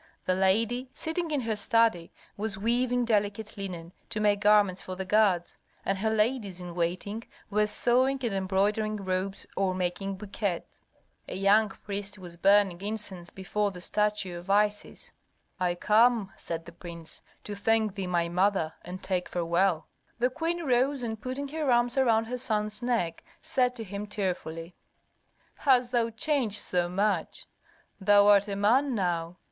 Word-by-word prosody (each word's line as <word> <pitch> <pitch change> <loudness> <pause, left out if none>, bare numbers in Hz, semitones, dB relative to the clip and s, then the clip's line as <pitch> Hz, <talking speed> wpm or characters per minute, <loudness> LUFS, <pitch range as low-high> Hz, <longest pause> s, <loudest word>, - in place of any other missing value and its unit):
The 185 - +2
lady, 225 +7 +1
sitting 325 +1 -2
in 295 -3 0
her 225 -2 -1
study, 210 -4 +2 0.2
was 215 0 -2
weaving 245 +3 +1
delicate 210 -1 0
linen 180 -4 -6 0.2
to 225 -2 -3
make 205 -1 +3
garments 205 -3 +4
for 185 - -6
the 190 +1 -4
gods, 190 -3 +2 0.3
and 195 - +1
her 220 +2 +1
ladies 215 -3 0
in 175 -1 -7
waiting 180 +6 -2 0.3
were 210 +1 +2
sewing 255 +5 +2
and 230 -4 0
embroidering 200 +3 0
robes 190 0 -3
or 190 -1 0
making 185 +2 -2
bouquets. 195 -2 -4 0.5
A - - -5
young 200 +3 +4
priest 200 +1 -5
was 175 -3 -10
burning 195 0 +3
incense 200 -4 -5
before 205 +3 -2
the 185 -2 -9
statue 205 -2 -1
of 175 +3 -13
Isis. 205 +1 0 0.5
"I 180 -1 +1
come," 215 +1 +3
said 165 -1 -6
the - - -10
prince, 170 -1 -11 0.2
"to 210 - -5
thank 220 0 +1
thee, 195 -2 -4
my 170 -1 +1
mother, 180 -2 +1
and 180 +2 -8
take 185 -2 -2
farewell." 170 -1 +1 0.3
The 250 +2 +1
queen 330 +3 -2
rose 260 +1 +2
and 220 -2 -4
putting 260 +4 -4
her 305 -1 -2
arms 240 +1 +3
around 230 -4 +3
her 250 +2 -4
son's 215 -3 -1
neck, 230 -10 -1 0.2
said 255 -6 +1
to 230 - -6
him 200 +1 -6
tearfully, 180 -5 -4 0.8
"Hast 250 -3 +3
thou 235 -2 +2
changed 230 -2 0
so 175 -3 0
much? 195 -1 -1 0.5
Thou 205 +1 +5
art 205 0 +5
a 200 - -3
man 245 +7 +3
now! 175 -3 -1
205 Hz, 160 wpm, -28 LUFS, 185-230 Hz, 0.8 s, Thou